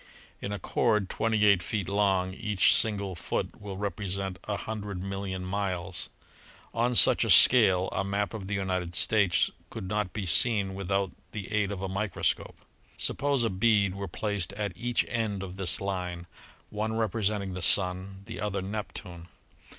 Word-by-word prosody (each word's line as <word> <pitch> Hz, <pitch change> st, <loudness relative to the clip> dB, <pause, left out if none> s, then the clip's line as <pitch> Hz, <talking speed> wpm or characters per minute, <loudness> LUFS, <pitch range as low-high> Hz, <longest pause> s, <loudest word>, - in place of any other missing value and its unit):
In 100 Hz, -, -4 dB
a 105 Hz, -, -3 dB
cord 105 Hz, +1 st, 0 dB
twenty 110 Hz, -1 st, +1 dB
eight 100 Hz, -3 st, +5 dB
feet 100 Hz, +1 st, -3 dB
long 95 Hz, -2 st, +1 dB
each 105 Hz, -2 st, +3 dB
single 100 Hz, -3 st, +1 dB
foot 90 Hz, +3 st, -4 dB
will 100 Hz, -2 st, -7 dB
represent 95 Hz, -1 st, -3 dB
a 105 Hz, -1 st, -2 dB
hundred 105 Hz, -4 st, -5 dB
million 95 Hz, -1 st, -4 dB
miles. 95 Hz, -2 st, -3 dB, 0.6 s
On 120 Hz, +2 st, 0 dB
such -, -, +7 dB
a -, -, -2 dB
scale 95 Hz, -7 st, +7 dB
a 95 Hz, -, -1 dB
map 100 Hz, +2 st, -2 dB
of 100 Hz, -4 st, -6 dB
the 105 Hz, -, -2 dB
United 90 Hz, -3 st, -2 dB
States 100 Hz, -5 st, +2 dB, 0.2 s
could 95 Hz, -, -7 dB
not 105 Hz, -1 st, -2 dB
be 100 Hz, +1 st, -4 dB
seen 100 Hz, +1 st, +4 dB
without 95 Hz, 0 st, -1 dB, 0.2 s
the 100 Hz, -2 st, -6 dB
aid 105 Hz, -2 st, 0 dB
of 95 Hz, -1 st, -5 dB
a -, -, -1 dB
microscope. 100 Hz, 0 st, -2 dB, 0.4 s
Suppose 140 Hz, -3 st, +1 dB
a 115 Hz, -, 0 dB
bead 100 Hz, 0 st, +2 dB
were 100 Hz, 0 st, -5 dB
placed 100 Hz, +1 st, -2 dB
at 100 Hz, -2 st, -3 dB
each 120 Hz, +3 st, 0 dB
end 110 Hz, -5 st, -2 dB
of 95 Hz, 0 st, -8 dB
this 95 Hz, -2 st, 0 dB
line, 90 Hz, -3 st, -4 dB, 0.5 s
one 110 Hz, +1 st, -2 dB
representing 105 Hz, -3 st, -1 dB
the 90 Hz, -, -5 dB
Sun, 95 Hz, +2 st, +2 dB
the -, -, -8 dB
other 100 Hz, -2 st, -2 dB
Nep 105 Hz, +2 st, -5 dB
tune. 85 Hz, -3 st, -9 dB
100 Hz, 165 wpm, -28 LUFS, 95-105 Hz, 0.6 s, such